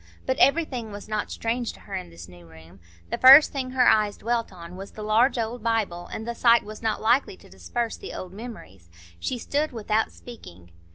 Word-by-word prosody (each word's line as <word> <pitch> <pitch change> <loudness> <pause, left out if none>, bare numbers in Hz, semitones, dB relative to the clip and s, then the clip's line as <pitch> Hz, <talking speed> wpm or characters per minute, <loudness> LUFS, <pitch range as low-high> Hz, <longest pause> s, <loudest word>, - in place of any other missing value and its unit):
But 260 0 -1
everything 275 -7 +2
was 205 0 -9
not 215 -1 -3
strange 235 +1 -3
to - - -17
her 200 - -12
in 185 - -5
this 85 0 -12
new 90 -1 -15
room; 80 +3 -16 0.3
the - - -2
first 270 +4 +9
thing 265 -2 -4
her 255 -1 +2
eyes 210 -2 +3
dwelt 235 0 -2
on 175 -1 -11
was 195 +1 -10
the 215 - -8
large 225 +5 +2
old 230 +1 -3
Bible, 215 -6 -1
and 220 - -6
the 235 - -2
sight 235 0 +4
was 215 +1 -10
not 220 -1 -1
likely 270 - +2
to - - -18
disperse 235 -2 -4
the - - -9
old 185 0 -8
memories. 195 - -11 0.3
She 255 - -3
stood 295 +5 -2
without 220 -2 -1
speaking. 90 - -13
220 Hz, 210 wpm, -25 LUFS, 190-245 Hz, 0.3 s, first